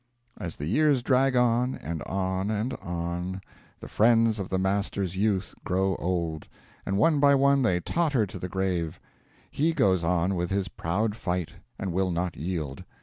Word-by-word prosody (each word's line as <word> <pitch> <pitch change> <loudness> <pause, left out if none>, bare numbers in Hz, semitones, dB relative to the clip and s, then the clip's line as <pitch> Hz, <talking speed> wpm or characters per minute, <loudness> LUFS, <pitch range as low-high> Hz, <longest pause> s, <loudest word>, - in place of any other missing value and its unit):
As 85 -2 -5
the 75 - -5
years 140 - +3
drag 130 +1 +3
on, 125 +1 +2
and 80 -1 -5
on, 95 +1 -1
and 110 +4 -1
on, 90 +2 -3 0.4
the - - -9
friends 115 -1 +3
of 95 - -4
the 95 - 0
Master's 95 -1 -1
youth 95 -2 0
grow 95 +1 +1
old; 85 -3 -2 0.4
and 95 - 0
one 150 +7 +4
by 140 0 +6
one 140 0 +4
they 95 -8 +2
totter 145 - +1
to 95 - -9
the 90 - -5
grave: 90 -4 -2 0.5
he 160 +3 +1
goes 95 - +2
on 90 +2 +1
with 90 -1 -1
his 100 0 -1
proud 105 +6 -1
fight, 90 -5 -3 0.2
and 95 -3 -3
will 95 +1 +1
not 90 -1 -2
yield. 80 -5 -4
95 Hz, 170 wpm, -27 LUFS, 90-115 Hz, 0.5 s, by